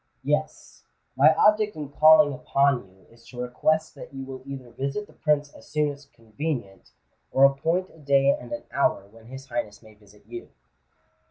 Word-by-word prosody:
"Yes: 150 +2 -3 0.3
my 140 +4 +6
object 210 0 +3
in 150 -3 -6
calling 155 0 +6
upon 135 -3 +1
you 95 +1 -25
is 115 0 -21
to 125 0 -11
request 155 +6 0
that - - -11
you 135 - -6
will 130 -1 -8
either 130 -3 -8
visit 140 - -4
the - - -21
Prince 150 -2 0
as 110 - -16
soon 150 -1 0
as 140 0 -13
convenient, 115 -3 -6 0.4
or 135 - +3
appoint 165 +7 0
a 160 - -19
day 140 -1 +3
and - - -5
an 295 - -5
hour 140 -7 +1
when 110 +2 -18
his 135 +2 -11
Highness 105 -2 -4
may 110 -1 -16
visit 105 0 -22
you." 355 +1 -9
140 Hz, 180 wpm, -25 LUFS, 120-155 Hz, 0.4 s, my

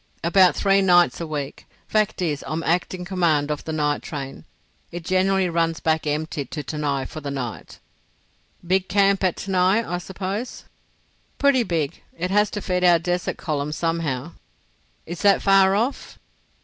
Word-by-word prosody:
"About 180 +2 +5
three 195 0 +3
nights 175 -2 +4
a 165 - -4
week. 145 -3 -5 0.2
Fact 215 -3 0
is 150 -4 -2
I'm 160 +1 -3
in - - -2
acting 180 +1 -1
command 165 -6 +1
of 150 - -4
the 160 - -4
night 150 -2 0
train. 135 -3 -7 0.5
It 175 -1 -7
generally 190 +1 +2
runs 165 -1 0
back 160 -1 0
empty 150 0 -2
to 145 +3 -6
Tanai 145 -2 -2
for 155 - -8
the 145 - -5
night." 130 -5 -6 0.9
"Big 185 +1 +1
camp 200 -1 +3
at 185 -2 +2
Tanai, 190 +3 +2
I 175 +1 -2
suppose?" 195 +6 -5 0.7
"Pretty 280 -2 +4
big. 165 -9 -2 0.2
It 180 +2 -2
has 210 +1 +3
to 205 - -5
feed 180 -1 -1
our 175 -1 +6
desert 175 +2 -2
column 150 -3 -3
somehow." 165 -2 -2 0.7
"Is 170 +1 -7
that 200 -1 +5
far 195 0 +5
off?" 235 +7 -2
175 Hz, 160 wpm, -23 LUFS, 155-190 Hz, 0.9 s, our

